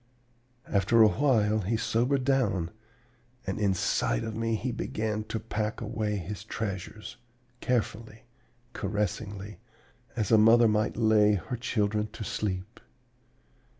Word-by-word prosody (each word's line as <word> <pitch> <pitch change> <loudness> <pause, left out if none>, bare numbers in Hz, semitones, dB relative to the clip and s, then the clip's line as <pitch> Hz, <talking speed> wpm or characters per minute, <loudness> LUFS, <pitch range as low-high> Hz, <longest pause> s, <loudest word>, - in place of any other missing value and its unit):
"After 110 +3 +4
a - - +8
while 110 -4 +2
he 105 +3 -1
sobered 125 +5 +1
down, 105 -11 +1 0.7
and 95 +1 -3
inside 95 - +1
of 110 - -4
me 115 0 0
he 125 +3 -2
began 110 -2 -2
to 110 - -3
pack 110 0 -3
away 110 -2 -2
his 100 0 -5
treasures 105 +3 -5 0.4
carefully, 115 -1 -2 0.5
caressingly, 100 0 -3 0.6
as 110 -4 -1
a 110 - +7
mother 115 +2 +6
might 105 +1 +1
lay 110 -2 +4
her 100 +7 -4
children 105 -3 0
to 115 - -6
sleep. 100 +1 -4
110 Hz, 120 wpm, -28 LUFS, 105-115 Hz, 0.7 s, a